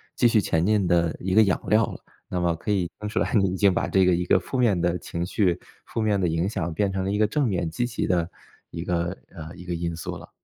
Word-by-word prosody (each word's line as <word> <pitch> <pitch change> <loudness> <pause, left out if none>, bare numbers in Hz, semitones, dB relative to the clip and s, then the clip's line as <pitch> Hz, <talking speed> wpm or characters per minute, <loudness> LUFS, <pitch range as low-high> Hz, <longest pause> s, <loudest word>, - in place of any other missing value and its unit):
继 120 - +4
续 115 - +4
前 80 -4 +1
进 105 -3 +2
的 85 -2 +2
一 95 +1 -2
个 110 - +7
养 95 -4 +1
料 110 0 +4
了。 - - -8 0.3
那 90 - -2
么 85 -1 +1
可 105 +6 -4
以 90 -4 0
听 105 - -3
出 110 - -1
来 - - -1
你 100 -4 +3
已 95 - -3
经 100 -2 +4
把 - - 0
这 95 -1 +4
个 90 - +4
一 90 +1 -1
个 - - +4
负 130 - -5
面 110 -8 +3
的 90 +1 +1
情 85 0 -4
绪、 90 -1 +1 0.3
负 115 - -3
面 105 -2 +2
的 - - +2
影 85 +3 0
响 85 -6 -3
变 100 +4 +1
成 95 -1 -1
了 95 - -1
一 105 - 0
个 105 0 +3
正 140 +6 0
面 85 -4 -1
积 120 +10 -1
极 120 -1 -2
的 85 -2 +1 0.4
一 85 - -6
个 90 +1 -1 0.2
呃， 80 0 -8
一 90 - -11
个 90 -1 -3
因 85 0 -3
素 80 - -5
了。 - - -13
90 Hz, 305 characters per minute, -25 LUFS, 85-105 Hz, 0.4 s, 个